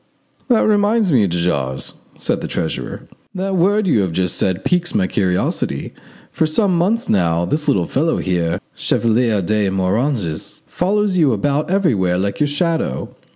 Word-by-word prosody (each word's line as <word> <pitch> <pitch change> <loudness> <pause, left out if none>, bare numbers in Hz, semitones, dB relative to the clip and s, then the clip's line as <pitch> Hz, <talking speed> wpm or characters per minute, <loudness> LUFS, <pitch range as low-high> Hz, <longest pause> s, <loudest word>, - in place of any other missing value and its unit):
"That 240 -4 +3
reminds 210 -1 +2
me, 115 -8 +4
de 90 0 -2
Jars!" 70 -6 -1 0.2
said - - -1
the - - -4
treasurer, - - -4 0.3
"that 190 +1 -2
word 200 +4 +2
you 135 - +3
have 90 -4 -2
just 90 +1 0
said 95 0 -1
piques 175 +2 0
my 200 -3 +3
curiosity. 95 - -1 0.4
For 160 - +1
some 185 +4 +1
months 200 +7 +1
now 85 -3 +1
this 150 - -2
little 90 -3 +2
fellow 160 - 0
here, 85 -2 -1
Chevalier 115 -3 +1
de 105 +2 +1
Moranges, 95 - -1
follows 195 +1 0
you 145 -6 +4
about 140 +9 0
everywhere 115 - +1
like 100 +2 -2
your 150 - +2
shadow. 145 - -2
125 Hz, 155 wpm, -18 LUFS, -, 0.4 s, me